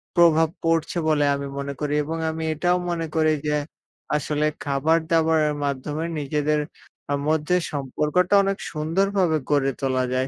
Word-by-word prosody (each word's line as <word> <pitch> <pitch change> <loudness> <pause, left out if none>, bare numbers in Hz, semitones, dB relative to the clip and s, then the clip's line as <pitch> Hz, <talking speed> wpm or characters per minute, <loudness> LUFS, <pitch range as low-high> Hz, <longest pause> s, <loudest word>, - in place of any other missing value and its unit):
প্রভাব 165 -2 +5
পড়ছে 165 +1 +1
বলে 150 -2 +3
আমি 140 0 -4
মনে 140 0 -3
করি 150 -1 -1
এবং 165 +2 -4
আমি 160 0 -5
এটাও 175 +4 +1
মনে 165 -1 -2
করি 155 -1 +3
যে, 150 - +1 0.6
আসলে 150 +1 -1 0.2
খাবার-দাবারের 160 +1 +2
মাধ্যমে 145 +4 -3
নিজেদের 150 +1 0 0.5
আ - - +2 0.2
মধ্যে 155 +3 +1 0.2
সম্পর্কটা 150 +7 0
অনেক 195 0 0
সুন্দরভাবে 170 +2 +1
গড়ে 140 -2 +2
তোলা 130 -1 +1
যায়। 130 +1 0
155 Hz, 140 wpm, -23 LUFS, 145-165 Hz, 0.6 s, প্রভাব